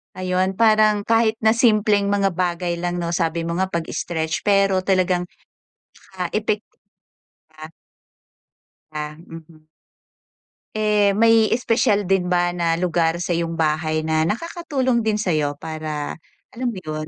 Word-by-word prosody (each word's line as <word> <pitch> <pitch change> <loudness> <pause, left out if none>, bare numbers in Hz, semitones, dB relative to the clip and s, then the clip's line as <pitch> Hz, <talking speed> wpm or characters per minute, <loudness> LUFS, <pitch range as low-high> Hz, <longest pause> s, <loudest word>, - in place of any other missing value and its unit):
Ayun, 185 +1 -1
parang 215 -1 +3
kahit 225 0 +2
na 220 - +5
simpleng 215 -3 +3
mga 200 -1 +1
bagay 175 -1 -2
lang 175 0 -2
'no 170 0 -2
sabi 165 -1 -1
mo 170 +1 -3
nga 190 - +1
pag-stretch 165 -1 -3
pero 195 -2 +3
talagang, 185 -1 0 0.9
ah, 180 - -1
epek 215 0 -1
di - - -43 0.7
ba? 155 0 -11 1.2
Ah, 150 0 -5
mhm. 165 -2 -14 1.1
Eh, 210 -2 +2
may 225 0 +4
espesyal 225 -3 +1
din 190 -1 +1
ba 175 0 +1
na 170 -2 0
lugar 170 -1 0
sa'yong 170 -1 -2
bahay 155 0 0
na 160 0 +1
nakakatulong 265 - -1
din 220 -2 0
sa'yo 155 -8 -1
para, 155 -1 -5 0.3
alam 250 +2 -4
mo 190 - -7
'yun, 155 -1 -5
180 Hz, 135 wpm, -21 LUFS, 165-210 Hz, 1.2 s, na